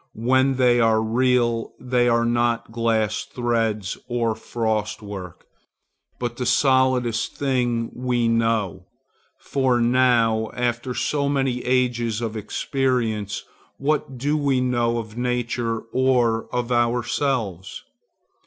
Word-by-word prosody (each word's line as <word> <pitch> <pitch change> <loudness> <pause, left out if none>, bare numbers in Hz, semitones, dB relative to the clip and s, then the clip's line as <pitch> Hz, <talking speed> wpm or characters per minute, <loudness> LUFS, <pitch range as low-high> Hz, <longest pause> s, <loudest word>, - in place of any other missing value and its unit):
When 130 +3 +2
they 125 -2 +4
are 115 -1 +4
real, 120 0 +1
they 125 -1 +1
are 115 0 +2
not 120 -1 0
glass 115 -2 0
threads 115 -5 -2
or 120 -2 0
frostwork, 105 -5 -4 0.7
but 120 -1 -4
the 125 - -2
solidest 130 -3 +2
thing 125 -4 0
we 125 -1 0
know. 115 -5 0 0.5
For 130 -3 0
now, 115 -2 +3
after 125 0 -2
so 140 -1 0
many 135 -3 0
ages 120 -3 0
of 115 -2 -4
experience, 110 -2 -1 0.3
what 140 -2 -1
do 145 +5 0
we 140 -3 +1
know 120 -2 +1
of 110 -1 -6
nature 120 -2 -1
or 125 -4 +2
of 125 0 -2
ourselves? 120 - -1
120 Hz, 110 wpm, -23 LUFS, 115-125 Hz, 0.7 s, they